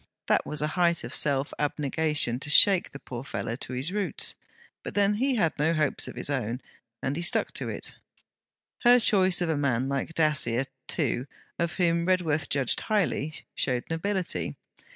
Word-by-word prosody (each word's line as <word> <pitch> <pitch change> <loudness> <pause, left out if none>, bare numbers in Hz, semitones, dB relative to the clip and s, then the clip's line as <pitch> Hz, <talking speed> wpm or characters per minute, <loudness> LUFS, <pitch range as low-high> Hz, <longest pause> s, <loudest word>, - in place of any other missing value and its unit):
That - - +2
was 150 0 -2
a 150 - 0
height 170 -2 +2
of - - -6
self 140 -1 0
abnegation 150 -3 0
to 145 - -6
shake 185 +5 +6
the - - -8
poor 125 -3 -7
fellow 115 -3 -4
to 130 - -5
his 130 +7 -1
roots; 205 0 0 0.5
but, - - -7
then, 205 0 +3
he 260 +5 +1
had 170 -8 +2
no 160 +3 +2
hopes 155 -1 +1
of - - -8
his - - -4
own; 125 -4 -2 0.4
and 135 +1 -1
he 170 - -3
stuck 175 - +1
to - - -2
it. - - -4 0.9
Her 245 0 +6
choice 190 -5 +2
of 175 - 0
a 160 - +1
man 130 -3 0
like 140 +4 -3
Dacier, 135 -6 +2 0.2
too, 135 -4 0 0.3
of 170 0 0
whom 170 -1 +1
Redworth 160 -6 +1
judged 135 -3 +1
highly, 175 -8 -1
showed 125 -2 -1
nobility. 185 +2 -2
155 Hz, 175 wpm, -27 LUFS, 135-180 Hz, 0.9 s, shake